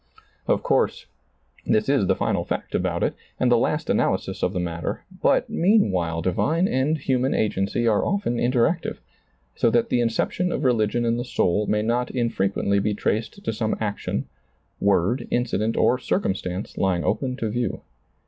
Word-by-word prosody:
Of - - +1
course, - - +1 0.6
this 110 -1 +1
is 135 -8 +2
the 95 - +3
final - - 0
fact - - -4
about - - 0
it - - +1 0.3
and - - +2
the - - +6
last - - 0
analysis - - 0
of 90 - +1
the 95 - -2
matter, 85 -2 -3 0.2
but - - +3
meanwhile 95 - +2
divine 160 - +1
and 140 +3 +1
human 130 -2 0
agency 105 +2 0
are 105 -2 +3
often 200 -12 0
interactive, 120 0 +1 0.6
so 115 - +3
that 115 0 +2
the 120 - +2
inception 120 +10 0
of 145 - -2
religion 120 -2 +2
in 115 0 +1
the 120 - -2
soul 105 -4 0
may 105 0 +1
not 120 +2 0
infre 115 -6 0
quently 100 0 +1
be 105 0 0
traced 110 - -2
to - - -1
some 110 0 -1
action, 100 -10 -2 0.5
word, 100 +5 +1
incident 115 -2 0
or 125 - +3
circumstance 95 - -2
lying 95 -3 +1
open 130 -2 -1
to 115 -4 -2
view. 120 +1 -2
115 Hz, 165 wpm, -24 LUFS, 100-125 Hz, 0.6 s, the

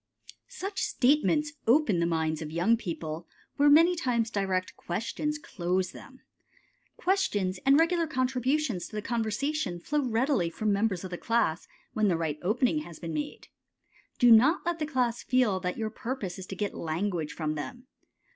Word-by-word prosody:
Such 390 0 -5
statements 295 +3 +2
open 235 - +4
the 170 - +2
minds 160 -1 -1
of 155 - -5
young 175 +8 +3
people 165 -5 -5 0.3
where 290 +1 +5
many 330 +5 +6
times 235 -8 0
direct 190 -3 -1
questions 235 +11 -3
close 185 - -2
them. - - -13 0.8
Questions 205 - 0
and 275 +2 +7
regular 335 0 +2
contributions 255 - 0
to - - -11
the 210 - -3
conversation 235 - -1
flow 295 +11 -1
readily 240 - +1
from 210 +4 -1
members 200 -3 0
of 185 - -6
the 175 - -5
class 230 -8 0 0.3
when 215 -1 +2
the 175 -4 +2
right 155 -2 -2
opening 250 - +1
has 170 - -9
been 165 -2 -6
made. 150 -1 -5 0.7
Do 245 -1 +6
not 265 +12 +6
let 345 -1 -1
the 305 - -1
class 250 -5 0
feel 245 -7 +2
that 180 -1 -3
your 220 -1 -2
purpose 220 -7 -5
is 185 - -8
to 195 - -6
get 205 +2 -2
language 165 0 -2
from 155 -2 -2
them. 155 - -7
220 Hz, 165 wpm, -28 LUFS, 175-275 Hz, 0.8 s, and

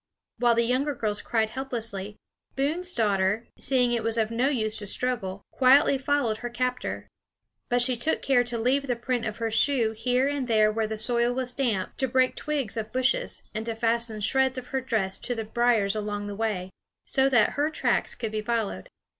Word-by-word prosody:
While 240 -1 +4
the 235 - +3
younger 265 +5 0
girls 210 -3 -2
cried 220 -2 0
helplessly, 225 -6 -4 0.4
Boone's 320 +7 -1
daughter, 205 0 +1
seeing 250 -2 +3
it 235 -1 0
was 225 +1 +1
of 220 0 +1
no 245 +4 +1
use 220 -5 -1
to 205 - -5
struggle, 200 -4 -1
quietly 270 +1 +5
followed 270 -5 0
her 240 - -5
captor. 250 +1 -3 0.6
But 245 0 +3
she 250 0 +2
took 240 +7 -1
care 255 -3 +4
to 240 -1 -3
leave 265 +5 +1
the 245 - 0
print 240 0 -2
of 215 0 -4
her 230 -1 -2
shoe 235 -1 +2
here 250 +4 +1
and 285 -3 -2
there 215 -2 +4
where 220 0 -1
the 220 0 -4
soil 235 +2 +1
was 255 0 -2
damp, 230 -9 -1
to 265 - 0
break 255 +1 +2
twigs 280 -8 -3
of 220 -1 -4
bushes, 255 0 0
and 215 +1 -3
to 230 - -2
fasten 230 -1 0
shreds 265 +4 +2
of 250 -1 -7
her 265 -1 -1
dress 215 -7 -1
to 245 - -3
the 225 -1 -4
briers 220 -3 +2
along 205 -1 -3
the 205 0 -5
way, 200 -4 -2 0.3
so 270 0 +2
that 240 -5 +4
her 290 +2 0
tracks 315 - 0
could 225 -3 -4
be 215 0 -2
followed. 225 -2 -2
235 Hz, 200 wpm, -26 LUFS, 215-255 Hz, 0.6 s, quietly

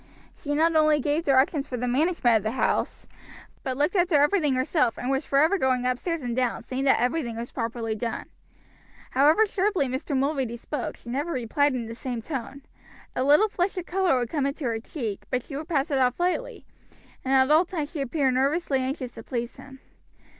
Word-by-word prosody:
She 290 0 -3
not 325 +2 +3
only 305 -1 +4
gave 295 +4 0
directions 275 +2 +2
for 250 - -4
the 250 +1 -2
management 255 -3 +3
of - - -3
the 215 +3 -2
house, - - -1 0.6
but 260 -1 -3
looked 295 +7 +1
after 355 -3 +3
everything 295 -1 +3
herself, 255 -1 +1
and 250 - -2
was 270 +2 -1
forever 315 +8 +3
going 255 -3 +1
upstairs 285 +5 -1
and 240 -1 -2
down, 250 -2 -1
seeing 260 +3 -3
that 270 - +4
everything 245 -1 -1
was 235 +1 -6
properly 230 -2 -3
done. 225 +1 -4 0.9
However 300 +11 +5
sharply 390 -6 0
Mr. 265 +2 -2
Mulready 265 -4 -1
spoke 260 +2 -5
she 235 - -9
never 285 +7 -2
replied 265 +2 +1
in 240 -2 -3
the 225 - -7
same 240 -1 -5
tone. 275 0 -6 0.5
A 255 - 0
little 295 +10 +5
flush 380 -1 -2
of 360 - -3
color 370 -6 +1
would 240 -2 -2
come 285 -4 0
into 280 +2 -5
her 230 -2 -1
cheek, 225 -4 -5
but 250 -2 -1
she 280 - -9
would 305 +3 -5
pass 300 -2 0
it 275 - +2
off 250 +2 +1
lightly, 365 +8 -2 0.6
and 270 +1 +1
at 265 +2 +4
all 315 +3 +6
times 325 -5 -4
she 315 -5 -4
appeared 275 0 +1
nervously 275 +2 +1
anxious 260 -1 -3
to 225 - -9
please 235 0 -4
him. 265 -1 -13
275 Hz, 205 wpm, -26 LUFS, 250-310 Hz, 0.9 s, all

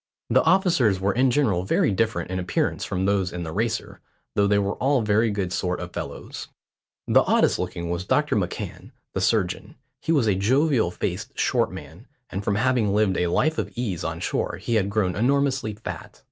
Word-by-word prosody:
The 130 +3 +5
officers 160 - +3
were 95 +1 +1
in 130 +2 +3
general 120 -9 +2
very 95 - +2
different 95 -4 -1
in 95 - -1
appearance 90 - -1
from 95 +1 -2
those 100 -2 +1
in 90 -1 -5
the 80 - -5
Racer, 110 +6 -2 0.3
though 100 0 +3
they 100 0 +3
were 100 0 0
all 135 -2 +2
very 110 +2 +2
good 100 -3 -2
sort 90 -1 -1
of 85 0 -7
fellows. - - -6 0.6
The - - +5
oddest - - +2
looking 85 0 -4
was 85 +1 -2
Dr - - +1
McCan, - - -4 0.2
the - - -1
surgeon. - - 0 0.2
He - - -2
was 145 -7 +3
a 105 - +3
jovial 125 - +2
faced - - -4
short - - +1
man, 90 - -11 0.2
and 95 +1 -4
from 100 - 0
having 115 -3 +2
lived 105 -3 +2
a 90 - +1
life 155 - +1
of - - -3
ease 110 -8 -3
on - - -3
shore - - -2
he 120 - -3
had 100 -3 +2
grown 100 -3 0
enormously 135 -2 +1
fat. 105 - -8
105 Hz, 195 wpm, -24 LUFS, 95-125 Hz, 0.6 s, The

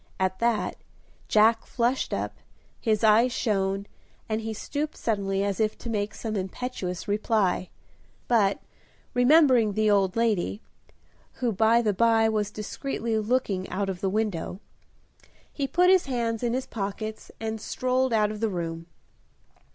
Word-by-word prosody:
At 190 0 0
that, 235 -2 0 0.5
Jack 225 +1 +4
flushed 245 +2 0
up, - - -3 0.4
his 220 -3 0
eyes 225 +3 +5
shone, 195 -4 0 0.4
and 220 0 -1
he 225 0 -4
stooped 290 +7 -4
suddenly 195 -3 -1
as 200 0 -2
if 215 -1 0
to 235 - -6
make 210 -1 -2
some 220 -2 -4
impetuous 190 -2 -4
reply. 205 -3 +1 0.6
But, 210 -5 +2 0.5
remembering 250 -4 +5
the 215 +1 +2
old 195 -2 +2
lady 215 -4 0 0.7
(who, 245 -2 -1
by 225 +3 +3
the 210 -2 +2
by, 225 +1 +4
was 210 -2 0
discreetly 220 +1 -3
looking 215 -4 -1
out 195 +1 -2
of 185 -2 -5
the 195 - +1
window), 200 -3 -2 0.9
he 280 -2 -2
put 360 +5 +4
his 375 -5 +4
hands 235 -3 -1
in 240 -1 0
his 260 +1 -1
pockets 215 +1 -5
and 220 -1 -4
strolled 255 +2 0
out 215 -2 +2
of 215 - -6
the 225 0 0
room. 165 -3 -4
220 Hz, 145 wpm, -26 LUFS, 200-235 Hz, 0.9 s, eyes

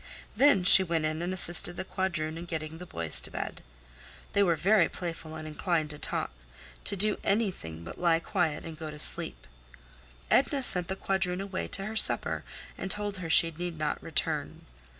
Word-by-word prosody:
Then 280 -9 +3
she 185 - +10
went 165 -3 -2
in 155 +1 -3
and 175 +1 -3
assisted 175 -1 +6
the - - -5
quadroon 165 -6 -3
in 170 +1 -8
getting 160 -1 -7
the 180 - -10
boys 80 - +5
to - - -4
bed. - - -7 0.7
They 200 - +2
were 175 -4 +2
very 190 +3 +2
playful 165 -2 -7
and 155 0 -8
inclined 155 0 -2
to 150 - -6
talk—to - - -5
do 210 +2 -1
anything 185 - -3
but 85 - -11
lie 170 -2 +2
quiet 170 -2 -3
and 165 -1 -10
go 160 -1 -7
to 150 - -10
sleep. - - +2 0.9
Edna 275 0 +1
sent 180 -7 +2
the 190 - -4
quadroon 190 -2 -3
away 195 -1 -5
to 195 - -4
her 215 +2 -7
supper - - 0 0.4
and 190 - -5
told 205 0 -2
her 175 -3 -7
she 165 +1 +7
need 175 0 -6
not 155 -1 -3
return. - - -4
175 Hz, 185 wpm, -27 LUFS, 155-190 Hz, 0.9 s, she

